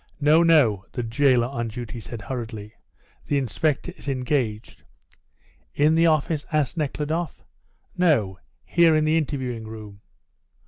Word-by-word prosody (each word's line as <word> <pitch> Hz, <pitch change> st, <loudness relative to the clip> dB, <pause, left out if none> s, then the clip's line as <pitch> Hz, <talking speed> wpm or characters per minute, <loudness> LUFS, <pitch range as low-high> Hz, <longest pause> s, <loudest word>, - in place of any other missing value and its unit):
"No, 155 Hz, +2 st, +5 dB
no," 140 Hz, -, +4 dB
the 120 Hz, -, -3 dB
jailer 125 Hz, +1 st, +3 dB
on 120 Hz, -2 st, -3 dB
duty 120 Hz, +1 st, -7 dB
said 115 Hz, 0 st, -8 dB
hurriedly, 110 Hz, -3 st, -6 dB, 0.5 s
"the 145 Hz, -, +1 dB
inspector 150 Hz, +6 st, -1 dB
is -, -, -7 dB
engaged." 125 Hz, -5 st, -2 dB, 0.9 s
"In 150 Hz, +2 st, +4 dB
the 165 Hz, +1 st, +4 dB
office?" 155 Hz, -1 st, +1 dB
asked 150 Hz, -4 st, 0 dB
Nekhludoff. 155 Hz, +1 st, -3 dB, 0.5 s
"No, 115 Hz, -, +2 dB, 0.3 s
here 170 Hz, -2 st, +4 dB
in 155 Hz, 0 st, +2 dB
the 155 Hz, +1 st, +2 dB
interviewing 130 Hz, -7 st, -2 dB
room.". 105 Hz, -2 st, -10 dB
135 Hz, 130 wpm, -24 LUFS, 115-155 Hz, 0.9 s, No